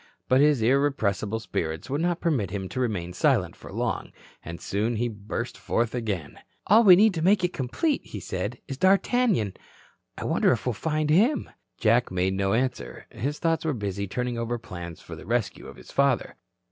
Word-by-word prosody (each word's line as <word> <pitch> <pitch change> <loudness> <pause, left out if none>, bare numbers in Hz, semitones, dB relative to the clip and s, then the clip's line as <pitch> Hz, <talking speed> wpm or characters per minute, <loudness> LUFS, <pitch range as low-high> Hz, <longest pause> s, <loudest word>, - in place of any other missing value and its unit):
But 130 +2 +4
his 145 -6 +4
irrepressible 110 -5 +1
spirits 80 -7 -4
would 140 +3 -1
not 175 0 0
permit 135 - 0
him 95 -1 -4
to 130 - -4
remain 100 -8 -2
silent - - +1
for - - -12
long, - - -2 0.3
and 85 +1 -7
soon 110 +4 -1
he 120 +2 0
burst 110 +2 -5
forth 115 -1 -1
again. 105 -11 -4 0.3
"All 220 +4 +6
we 190 -4 +9
need 210 +2 +5
to 165 - -3
make 190 +2 +3
it 180 - 0
complete," 210 - -1
he - - -8
said, - - -4
"is 135 0 -6
D'Artagnan. 195 - +3 0.6
I - - -5
wonder - - +3
if - - -4
we'll 125 - 0
find 155 +6 -1
him." 230 - +3 0.3
Jack 115 +2 +3
made 95 +1 0
no 95 0 0
answer. 125 +2 -2
His 135 +6 -3
thoughts 165 -1 0
were 160 -2 0
busy 100 -3 -3
turning 125 +4 -3
over 120 +1 -2
plans 85 -7 -8
for - - -9
the - - -12
rescue 115 -2 -1
of - - -10
his - - -13
father. 140 -3 +1
120 Hz, 190 wpm, -26 LUFS, 100-155 Hz, 0.6 s, we